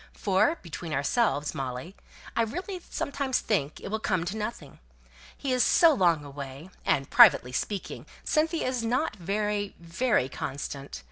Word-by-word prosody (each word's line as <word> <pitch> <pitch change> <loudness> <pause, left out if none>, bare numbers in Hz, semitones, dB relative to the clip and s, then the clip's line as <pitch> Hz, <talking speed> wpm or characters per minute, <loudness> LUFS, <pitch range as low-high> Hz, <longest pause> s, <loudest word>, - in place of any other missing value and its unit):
For, 205 - +2
between 165 -1 -6
ourselves, 145 - +1
Molly, 130 +7 -5 0.4
I - - +3
really 360 - -3
sometimes 280 -2 -1
think 155 -9 -1
it - - -7
will 220 +2 -1
come 185 -5 0
to 195 +4 -3
nothing. 210 -10 -6 0.6
He 270 -2 -1
is 250 - +4
so 335 -2 +6
long 170 - +2
away, 140 +4 -8
and, 135 0 +1
privately 175 - +7
speaking, 195 +9 -4 0.2
Cynthia 320 +2 +1
is 255 -2 -1
not 245 +2 0
very, 205 +2 -2
very 170 - +1
constant. 140 +1 -5
195 Hz, 145 wpm, -28 LUFS, 145-240 Hz, 0.6 s, privately